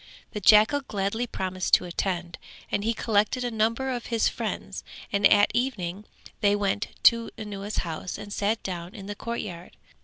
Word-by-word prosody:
The 210 - -4
jackal 215 +9 +6
gladly 220 0 -2
promised 185 -3 +1
to - - -1
attend, 175 -1 -3 0.3
and 200 - 0
he 225 - +2
collected 220 +2 +1
a 245 - -1
number 230 +4 0
of 245 -2 -4
his 230 -2 +2
friends - - -4 0.3
and 200 0 +6
at 205 -1 +5
evening 210 -6 -2 0.3
they 205 -1 +3
went 205 +1 0 0.2
to 230 -1 +5
Anuwa's 205 -1 -5
house 165 +2 -5
and 205 - -7
sat 215 +2 0
down 175 -1 -5
in 200 -3 -8
the 205 - -4
courtyard. 200 -6 -6
205 Hz, 165 wpm, -26 LUFS, 190-230 Hz, 0.3 s, jackal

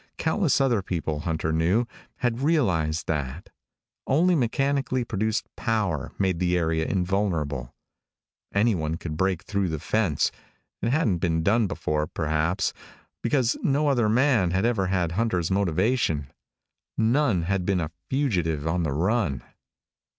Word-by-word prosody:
Countless 165 -2 +1
other 125 -6 +2
people, 80 -5 -3
Hunter 80 0 -2
knew, 90 +9 +2 0.3
had 120 -1 -1
realized 95 - +1
that. 75 0 -3 0.6
Only 170 +7 +3
mechanically 135 -1 +1
produced 110 0 -1
power 100 - -1
made 95 -3 0
the 90 -1 +2
area 80 -1 0
invulnerable. 85 -9 -1 0.8
Anyone 95 -7 +1
could 80 -3 -5
break 95 +1 0
through 100 -3 -1
the 80 - -2
fence. 95 0 +1 0.5
It 115 - 0
hadn't 120 - +1
been 80 -1 0
done 110 +4 +3
before, 75 -5 -1
perhaps, 80 +3 0 0.5
because 120 -1 +1
no 145 +1 +2
other 120 -6 +2
man 120 -5 +3
had 95 +4 +1
ever 110 -6 +1
had 90 -3 0
Hunter's 90 -3 0
motivation. 95 - +1 0.7
None 115 - +2
had 95 +1 0
been 95 0 +1
a 80 -2 -3 0.2
fugitive 90 - 0
on 85 +2 0
the 75 -4 -1
run. 85 - 0
95 Hz, 135 wpm, -25 LUFS, 80-115 Hz, 0.8 s, Only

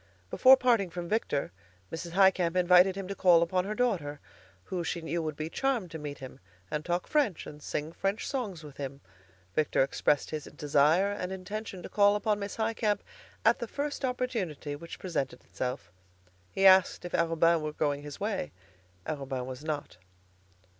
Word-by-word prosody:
Before 265 +1 +7
parting 235 -7 +2
from 175 0 -5
Victor, 170 - -1 0.4
Mrs. 165 +1 -6
Highcamp 185 -2 +4
invited 180 +1 +5
him 195 -1 -5
to 200 - -3
call 175 -4 +5
upon 180 +2 0
her 210 +2 -3
daughter, 170 -12 -1 0.4
who 180 - -3
she 170 - -2
knew 170 +1 -2
would 155 -2 -3
be 155 +1 -4
charmed 235 -2 -1
to 160 - -6
meet 145 -1 -6
him 130 -1 -10 0.3
and 150 - -2
talk 175 +1 -1
French 275 - +1
and 150 0 -10
sing 150 +2 -3
French 195 +4 -2
songs 210 - -3
with 145 -2 -11
him. 140 0 -6 0.5
Victor 150 0 +2
expressed 140 +1 0
his 155 -2 -4
desire 150 +7 +3
and 190 -2 -4
intention 190 0 -6
to - - -6
call 205 0 +4
upon 210 0 0
Miss 200 0 -5
Highcamp 220 -2 0 0.4
at 230 +2 +5
the 235 - -4
first 285 +3 -4
opportunity 225 - -2
which 165 +3 -9
presented 170 -7 -3
itself. 125 +1 -5 0.6
He 195 - +1
asked 190 -1 +6
if 175 - -7
Arobin 165 0 +3
were 155 0 -3
going 145 -1 -1
his 145 -1 -9
way. 205 -1 -2 0.5
Arobin 135 -4 -3
was 130 +2 -7
not. 155 - -4
175 Hz, 175 wpm, -29 LUFS, 150-205 Hz, 0.6 s, Before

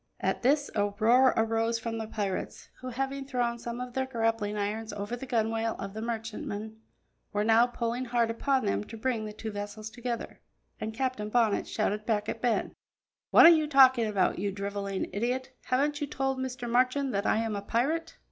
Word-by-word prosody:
At - - -1
this, 285 +3 +2
a 205 -1 +2
roar 250 +4 +6
arose 225 +1 +1
from 225 0 -4
the 220 - -4
pirates, 200 -4 -4
who, 255 - -7
having 270 +2 -3
thrown 245 -3 -1
some 235 +1 -5
of 250 -1 -6
their 265 0 -1
grappling 225 -4 -1
irons 215 +2 -2
over 205 +3 -4
the 265 +2 -8
gunwale 225 -1 0
of 195 0 -6
the 220 - -5
merchantman, 220 -1 -5 0.5
were 205 0 0
now 225 +2 +5
pulling 240 +1 -2
hard 235 -1 +1
upon 265 +3 0
them 100 +1 0
to 225 - -9
bring 225 -1 -1
the 210 - -5
two 220 +1 -6
vessels 205 +1 -6
together, 240 0 -5 0.4
and 220 0 -4
Captain 255 -4 -2
Bonnet 225 -2 +2
shouted 215 0 -1
back 210 -2 0
at - - -4
Ben: 240 -3 0 0.6
"What - - +8
are - - +12
you 315 -3 +4
talking 260 -5 +6
about, 200 -4 +1
you 200 +1 -1
drivelling 200 0 -3
idiot; 255 +5 -2
haven't 290 +4 +1
you 290 - -1
told 270 -1 -1
Mr. 255 -1 -4
Marchand 255 +3 +2
that 200 +1 0
I - - +3
am 225 -1 -1
a 200 - -3
pirate?" 305 +11 -1
230 Hz, 195 wpm, -29 LUFS, 215-255 Hz, 0.6 s, are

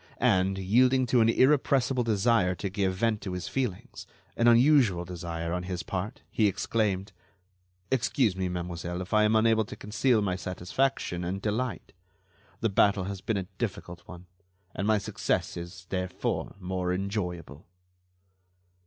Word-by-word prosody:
And, 95 +1 +2
yielding 125 +7 +3
to 120 0 +3
an 115 - +4
irrepressible 130 -1 +3
desire 105 -4 +2
to 100 +1 -4
give 95 -2 0
vent 110 +1 0
to 95 - -5
his 90 -1 -4
feelings—an 120 0 -3
unusual 120 - +5
desire 85 -1 -4
on 90 - -1
his 90 -1 -4
part—he 105 - -2
exclaimed: 100 0 -1 0.8
"Excuse 125 -4 +1
me, 95 -1 -2
mademoiselle, 90 0 -4
if 95 - -9
I 105 0 +5
am 110 +1 +3
unable 110 0 +4
to - - -9
conceal 110 +2 +1
my 95 -2 0
satisfaction 90 +1 -2
and 90 +3 -3
delight. 110 +4 -3 0.7
The 115 - +2
battle 100 0 +3
has 95 0 -5
been 110 - -1
a 95 - -3
difficult 90 -6 -4
one, 90 0 -11 0.5
and 100 - -2
my 110 -1 +4
success 100 - -2
is, 85 +2 -8
therefore, 90 -1 -2
more 90 -1 -2
enjoyable." 90 -5 -4
100 Hz, 145 wpm, -28 LUFS, 90-115 Hz, 0.8 s, unusual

